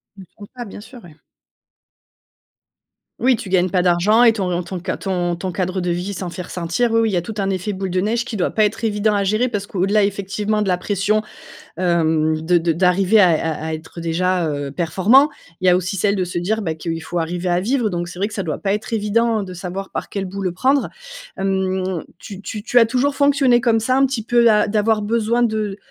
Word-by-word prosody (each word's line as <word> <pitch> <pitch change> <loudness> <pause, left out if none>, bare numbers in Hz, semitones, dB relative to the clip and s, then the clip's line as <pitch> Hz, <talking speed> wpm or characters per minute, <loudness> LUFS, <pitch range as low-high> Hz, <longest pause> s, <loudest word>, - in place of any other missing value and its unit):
De 195 - -12
tout 205 - -10
ça, 240 -1 -6
bien 205 - -10
sûr 240 -1 -13
ouais. 160 -3 -15 2.0
Oui 255 +1 +3
tu 220 -4 -8
gagnes 185 -1 +2
pas 180 -2 +2
d'argent 180 +6 +3
et 235 -2 +7
ton 180 -5 -2
ton 185 +1 -6
ca - - -1
ton 175 -3 -2
ton 185 +2 -4
cadre 185 +1 -2
de 175 - -2
vie 180 +4 -2
s'en 185 -1 -5
fait 180 +1 -6
ressentir. 180 +9 -1
Oui 230 - +3
oui 225 - +2
il - - -4
y 180 - +2
a 170 - -1
tout 220 - -6
un 195 0 0
effet 195 +2 -2
boule 190 0 -4
de 185 +1 0
neige 230 +5 0
qui 225 -5 -5
doit 180 - 0
pas 215 - +2
être 210 +2 -1
évident 210 -1 +1
à 200 - +1
gérer. 215 +6 +1
Parce 205 -3 -3
que - - -17
au-delà 200 +3 +3
effectivement 205 +2 -1
de 205 - -1
la 180 -1 +2
pression, 205 +3 0 0.5
hem, 160 -3 +1
de 175 +2 +3
de 165 0 +1
d'arriver 190 +4 +3
à 180 - +6
à 160 -1 -1
à - - -3
être, 160 +2 -8
heu, - - -6
déjà, 175 +1 0
heu, 145 -1 -4
performant, 190 - +4 0.3
il 185 - +1
y - - +8
a 180 - +5
aussi 185 +2 -3
celle 200 +1 +1
de 185 - 0
se 175 -1 -3
dire, 215 +5 -1
bah, 160 -4 -2
qu'il 165 +1 -4
faut 170 +2 -3
arriver 175 +2 -3
à 175 0 +1
vivre. 235 0 0
Donc 175 -1 -3
c'est 180 - -10
vrai 200 - +1
que 215 - -10
ça 195 -4 -3
doit 155 -3 -3
pas 195 -1 0
être 210 +3 -4
évident 225 0 +1
de 185 - -8
savoir 190 +2 -6
par - - -5
quelle 200 -1 -3
bout 195 +2 -6
le 185 -2 -1
prendre. 265 +10 +1 0.5
Hem, 190 -2 -1 0.2
tu 200 -2 -9
tu 210 0 -6
tu 245 +2 +4
as 230 - +6
toujours 260 +4 0
fonctionné 275 -4 +3
comme 230 -2 +3
ça 255 +4 +1
un 270 +1 +4
petit 255 -4 -2
peu 235 0 +4
a 210 0 +3
d'avoir 215 +1 +1
besoin 230 +2 0
de 215 -4 -1
195 Hz, 245 wpm, -20 LUFS, 180-220 Hz, 2.0 s, y